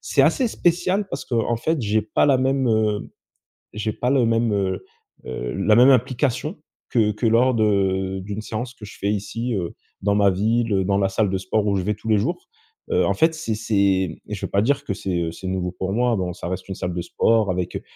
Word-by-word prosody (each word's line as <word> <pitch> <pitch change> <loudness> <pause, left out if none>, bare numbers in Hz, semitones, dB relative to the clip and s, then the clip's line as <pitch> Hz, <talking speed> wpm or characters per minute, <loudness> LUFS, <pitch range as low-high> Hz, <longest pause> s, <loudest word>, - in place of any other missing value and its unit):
c'est - - +2
assez 260 - +3
spécial 185 0 0
parce 135 - -5
qu'en 120 0 0
fait 155 +3 -1
j'ai 105 0 +1
pas 110 - +1
la 140 -3 +4
même, 130 -1 +1
heu, 110 -2 0 0.6
j'ai 105 0 -2
pas 125 - -1
le 130 -3 +3
même, 115 0 +1
heu, 95 -2 -1 0.4
heu, - - -4
la 105 +2 +3
même 125 +4 +7
implication 130 - 0 0.3
que 110 -4 +2
que 105 +3 -1
lors 120 +3 +4
de, 95 -3 +1
d'une 105 +2 -5
séance 120 +3 -5
que 110 - -11
je 105 - -12
fais 100 +1 -1
ici, 115 +4 -3
heu, 90 -5 -3 0.3
dans 100 +1 +1
ma 100 -1 +4
ville, 105 +1 +1
dans 100 +1 +1
la 95 - +2
salle 100 +1 +1
de 95 - 0
sport 100 +3 -1
où 100 -1 +1
je 95 - 0
vais 105 +3 -1
tous 105 - -12
les 110 - +4
jours. 170 - -3 0.4
Heu, - - +3
en - - +1
fait 160 0 +3
c'est 155 -9 -3
c'est 110 0 -5
et 95 -3 0
je - - -5
veux - - -6
pas 100 - +3
dire 140 +4 +1
que 100 - -2
c'est, 95 -3 -3
heu, 80 -1 -2
c'est 95 - -8
nouveau 90 -1 -2
pour 95 +1 -4
moi, 120 +1 +2
bon 90 -3 -2
ça 90 - -7
reste 95 +2 -5
une 95 - -4
salle 90 -1 -3
de 85 - -3
sport 110 +4 +2
avec, 90 -1 -2
heu, - - -3
105 Hz, 235 wpm, -22 LUFS, 95-120 Hz, 0.6 s, même